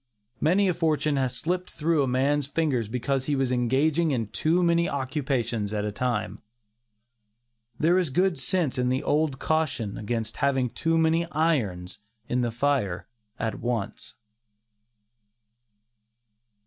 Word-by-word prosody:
Many 190 +6 +3
a 180 - +2
fortune 155 -3 +1
has 130 -2 0
slipped 180 +2 -2
through 160 0 +1
a 135 - +1
man's 135 +3 +1
fingers 140 -7 0
because 130 +3 -1
he 145 - 0
was 135 -2 0
engaging 140 +7 +2
in 115 -7 -1
too 170 +9 +1
many 170 0 +3
occupations 130 -6 -2
at 105 0 -1
a 105 - -2
time. 105 -4 -2 1.4
There 175 +4 +4
is 175 -5 0
good 180 +2 +1
sense 140 0 0
in 125 0 +1
the 130 +2 0
old 150 -2 +1
caution 130 -10 -1
against 110 +1 -3
having 135 -4 +1
too 165 0 0
many 165 +1 +2
irons 115 - -1 0.3
in 125 - 0
the 120 - 0
fire 115 -8 0 0.3
at 110 -3 -3
once. 110 -3 -3
135 Hz, 135 wpm, -26 LUFS, 120-160 Hz, 1.4 s, There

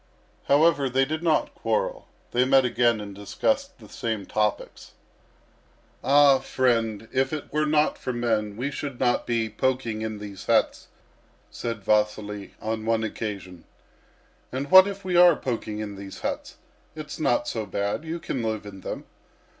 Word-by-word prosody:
However, 145 -1 +4
they 135 +2 +2
did 155 +3 -3
not 165 -3 +1
quarrel. - - -2 0.2
They 125 +1 +3
met 130 0 +4
again 120 -2 +2
and 100 -1 -7
discussed 275 - -1
the - - -14
same 110 -4 -3
topics. 105 +1 -2 1.1
"All, 140 -1 +5
mend, 115 -4 +1
if 130 0 +1
it 155 -2 -6
were 150 0 +1
not 150 0 +2
for 130 - -3
men 110 -4 -1
we 135 +4 -2
should 140 -3 -5
not 120 -1 +1
be 115 -2 0
poking 115 -1 -1
in 110 -1 -3
these 100 -2 -9
huts," - - +2 0.6
said 115 -3 -5
Vasily, 105 -1 0
on 110 0 -3
one 115 0 +1
occasion. 100 -5 -5 0.9
"And 135 +4 -4
what 190 +1 +10
if 200 -1 -6
we 180 -1 -1
are 175 -2 +8
poking 115 -6 -4
in 105 -2 -5
these 100 0 -9
huts? - - -4 0.4
It's 150 -2 -7
not 120 -5 +1
so 110 -3 -3
bad. 100 +8 -2
You 165 +1 -4
can 135 -5 -3
live 110 -2 -2
in 95 -2 -10
them." - - -5
120 Hz, 160 wpm, -25 LUFS, 105-145 Hz, 1.1 s, what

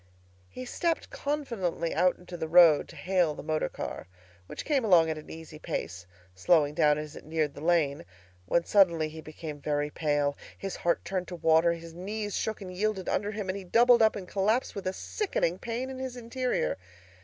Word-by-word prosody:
He 255 - -8
stepped 330 +6 -1
confidently 230 - -2
out 180 0 +3
into 180 0 -10
the 160 -2 -3
road 165 -3 +6
to - - -13
hail 180 -5 +1
the - - -8
motor 155 0 -1
car, - - -6 0.4
which - - -7
came 285 -4 +1
along 170 -6 +5
at 155 - -4
an 150 - -13
easy 160 -1 -10
pace, 90 - -5 0.3
slowing 145 - +3
down 150 0 +3
as 150 -1 -6
it - - -10
neared 155 -2 -1
the 145 - -10
lane; 160 - +1 0.4
when 170 - +2
suddenly 170 -6 +4
he 160 +1 -9
became 155 -1 -8
very 145 +1 -1
pale, 145 -2 0 0.2
his 195 -1 -5
heart 170 - 0
turned 185 -2 -2
to 180 - -6
water, 165 0 +4
his 165 -1 -9
knees 205 +4 -4
shook 220 -1 -2
and 185 -2 -7
yielded 200 -1 -1
under 205 +1 0
him, 210 -2 -5
and 190 +1 -2
he - - -9
doubled 235 +5 +5
up 220 -1 +4
and 190 -3 -6
collapsed 210 +7 0
with 195 -2 -5
a 185 - -1
sickening 190 - -2
pain 240 +3 -4
in 260 - -7
his 260 -1 -5
interior. 240 - -1
175 Hz, 200 wpm, -29 LUFS, 155-215 Hz, 0.4 s, road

